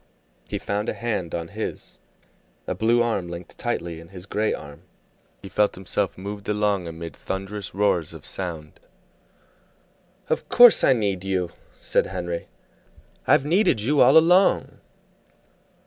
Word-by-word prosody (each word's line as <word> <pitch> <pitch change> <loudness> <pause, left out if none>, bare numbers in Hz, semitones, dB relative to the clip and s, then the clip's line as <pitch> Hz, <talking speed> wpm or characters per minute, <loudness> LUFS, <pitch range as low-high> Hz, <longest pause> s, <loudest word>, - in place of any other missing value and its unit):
He - - -2
found 105 +1 -2
a - - -3
hand 110 -8 -3
on 85 -1 -4
his, - - -6 0.7
a - - -2
blue 120 +2 +2
arm 100 -7 -1
linked 85 0 -8
tightly 85 -9 -3
in 85 - -13
his 90 0 -9
gray 105 +2 0
arm, 75 -1 -7 0.6
he - - -7
felt 105 +2 +1
himself 95 0 -2
moved 100 +2 -7
along 105 -4 0
amid 85 0 -7
thunderous 95 0 -5
roars 95 -6 +1
of 80 -3 -11
sound. 80 -5 -6 1.5
"Of - - -2
course 245 -2 +8
I - - +6
need 100 -6 -1
you!" 95 -3 -1 0.3
said - - +1
Henry. 90 -2 -4 0.8
"I've 135 - +4
needed 175 - +3
you 140 +7 +2
all - - +7
along." 180 +4 +4
95 Hz, 140 wpm, -24 LUFS, 85-110 Hz, 1.5 s, course